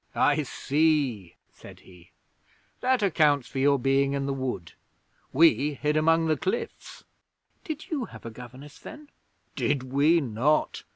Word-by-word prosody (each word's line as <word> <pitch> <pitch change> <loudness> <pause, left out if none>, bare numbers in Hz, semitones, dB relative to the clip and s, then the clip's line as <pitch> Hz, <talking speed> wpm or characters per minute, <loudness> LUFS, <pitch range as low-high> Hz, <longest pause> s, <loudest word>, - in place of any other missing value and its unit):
'I - - +3
see,' 140 - 0 0.2
said - - -14
he. 90 -2 -18 0.7
'That 255 -3 +1
accounts 150 -8 +2
for 135 - -5
your 140 +1 +4
being 135 +2 +1
in 140 -1 -2
the 140 - -1
wood. 130 -11 -4 0.6
We 145 -1 +3
hid 150 +2 -1
among 165 +1 +3
the 155 -1 +1
cliffs.' 455 +3 -5 0.6
'Did 310 0 -7
you 280 -6 -1
have - - -13
a 115 - -6
governess, 130 +5 -12
then?' 300 -1 -11 0.5
'Did 140 -3 0
we 155 +5 +4
not? 135 +3 0
145 Hz, 140 wpm, -26 LUFS, 130-165 Hz, 0.7 s, your